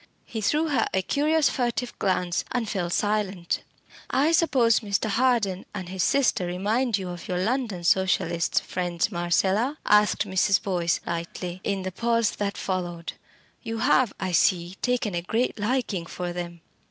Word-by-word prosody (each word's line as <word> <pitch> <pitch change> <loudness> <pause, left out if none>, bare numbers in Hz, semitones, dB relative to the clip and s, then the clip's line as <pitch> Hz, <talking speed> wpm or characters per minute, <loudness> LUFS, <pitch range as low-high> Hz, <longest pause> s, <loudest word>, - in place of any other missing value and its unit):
He 220 - -5
threw 305 +9 +1
her 285 - +2
a 190 - +1
curious 300 - +2
furtive 245 -1 -1
glance, 180 -2 0
and 245 -3 -1
fell 185 -5 -2
silent. 200 -2 -1 0.5
"I 285 +5 +2
suppose 260 -9 +4
Mr. 210 0 -1
Harden 225 -5 +1
and 185 -3 -5
his 190 0 -3
sister 220 -3 +2
remind 210 +6 0
you 185 -2 -5
of 175 -1 -7
your 180 - -1
London 215 -2 -1
Socialist 170 -2 +2
friends, 175 +1 -1
Marcella?" 190 - +1
asked 210 0 +4
Mrs. 190 +1 +3
Boyce 175 -4 0
lightly, 175 +2 -5
in 195 -2 -1
the 185 - -3
pause 230 +2 +1
that 200 -1 -2
followed. 175 -3 -3 0.5
"You 225 0 -4
have, 235 0 +3
I 190 -1 -2
see, 175 0 +2
taken 245 -5 0
a 170 - -1
great 225 +6 -1
liking 210 -6 -1
for 175 +1 -4
them." 170 -1 -6
195 Hz, 155 wpm, -25 LUFS, 180-235 Hz, 0.5 s, suppose